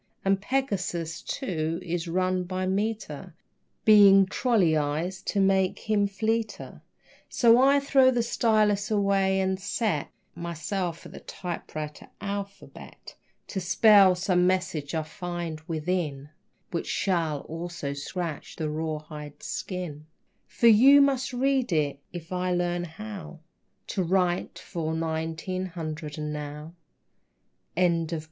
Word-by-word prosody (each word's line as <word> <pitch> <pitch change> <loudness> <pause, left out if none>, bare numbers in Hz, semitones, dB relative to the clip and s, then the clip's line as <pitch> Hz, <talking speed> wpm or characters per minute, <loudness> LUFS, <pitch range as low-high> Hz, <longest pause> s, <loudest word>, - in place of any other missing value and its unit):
And 195 0 +2
Pegasus, 190 -10 -2
too, 165 - -3
is 175 -1 -3
run 185 +1 0
by 185 +1 -3
meter, 190 -4 -3 0.5
Being 200 -2 +8
trolleyized 175 - 0
to 205 - -1
make 190 -1 +2
him 210 -2 +1
fleeter. 220 +3 -3 0.5
So 235 -1 +5
I 275 +1 +5
throw 275 -2 +4
the 245 -2 +1
stylus 215 -3 +2
away 195 -2 +2
and 190 0 0
set 205 -5 -1 0.2
Myself 170 +1 -4
at - - -10
the - - -9
typewriter 155 -4 -6
alphabet 200 0 -7 0.4
To 190 - -3
spell 195 0 +6
some 180 -1 +2
message 175 -5 -1
I 160 - 0
find 170 0 -5
within 155 -4 -2 0.4
Which 170 - -3
shall 165 -6 0
also 165 -3 -5
scratch 155 +2 -5
your 155 -1 -1
rawhide 150 -1 -5
skin, 165 -5 -5 0.4
For - - -2
you 250 +6 +8
must 275 -1 +2
read 265 -1 +1
it, 145 -4 0
if 170 0 -9
I 180 0 -1
learn 175 0 -1
how 170 -2 -9 0.5
To 195 - -1
write 180 -1 0
for 165 -2 -4
nineteen 160 +3 -3
hundred 155 -3 -6
and 150 0 -3
now. 150 +2 -7
180 Hz, 120 wpm, -27 LUFS, 160-200 Hz, 0.5 s, Being